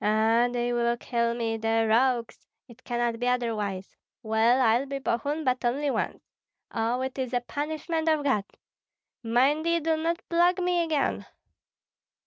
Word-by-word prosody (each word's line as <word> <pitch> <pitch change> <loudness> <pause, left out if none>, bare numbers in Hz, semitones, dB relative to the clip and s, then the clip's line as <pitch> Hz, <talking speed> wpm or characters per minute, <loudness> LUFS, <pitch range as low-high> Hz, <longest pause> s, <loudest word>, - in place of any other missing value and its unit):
"Ah, 220 +3 +3
they 240 0 -1
will 235 0 +1
kill 235 -1 -1
me, 225 -1 -2
the 225 0 +1
rogues; 240 +1 +1 0.2
it 235 +1 -17
cannot 240 -1 -1
be 245 - -1
otherwise. 215 -6 -2 0.3
Well, 225 +3 +3
I'll 245 +2 +3
be 275 0 -3
Bogun, 280 +4 -2
but 255 -2 0
only 275 +4 0
once. - - -3 0.5
Oh, 230 +2 -1
it 265 +1 -4
is 255 -1 -3
a 245 - +1
punishment 315 +4 -2
of 310 -2 +2
God! 215 -8 +1 0.8
Mind 260 +7 +2
ye 335 0 +2
do 320 0 +1
not 335 +2 -2
plague 350 +2 +3
me 355 -1 +1
again!" 310 -4 -1
245 Hz, 155 wpm, -27 LUFS, 230-290 Hz, 0.8 s, Ah